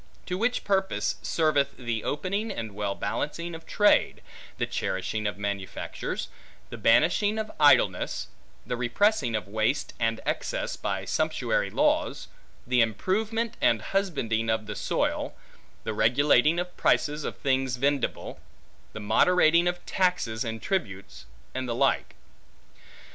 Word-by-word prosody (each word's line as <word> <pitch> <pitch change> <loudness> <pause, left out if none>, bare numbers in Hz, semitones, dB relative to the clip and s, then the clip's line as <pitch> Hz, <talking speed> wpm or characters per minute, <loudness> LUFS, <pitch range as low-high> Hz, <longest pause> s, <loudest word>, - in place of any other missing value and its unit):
To 180 - -3
which 235 +6 0
purpose 190 -1 0
serveth 145 -4 +1
the 120 -3 -3
opening, 200 +8 -2
and 110 - -5
well 100 -1 -2
balancing 170 +11 -3
of 165 0 -10
trade; 205 0 +3 0.3
the - - 0
cherishing 105 +3 -2
of 105 - -3
manufactures; 100 -1 -4 0.4
the 120 - -6
banishing 175 - +3
of 215 -1 -3
idleness; 145 -1 +4 0.4
the - - -2
repressing 125 - +1
of 105 - -3
waste, 110 +7 -1
and 115 -1 0
excess, - - -2
by - - -3
sumptuary - - 0
laws; - - 0 0.4
the 125 0 +3
improvement 220 - 0
and 115 - +4
husbanding 115 - -1
of 110 -1 0
the 105 0 -6
soil; - - -1 0.5
the 110 - -3
regulating 145 +8 +4
of 180 0 -4
prices 150 0 +1
of - - -4
things 130 -2 0
vendible; 140 0 -1 0.5
the - - -6
moderating 170 +9 +4
of 175 0 -2
taxes 180 - 0
and 115 -2 -5
tributes; 100 - -3 0.3
and 130 -1 -3
the 115 - -1
like. - - +1
135 Hz, 130 wpm, -27 LUFS, 110-180 Hz, 0.5 s, idleness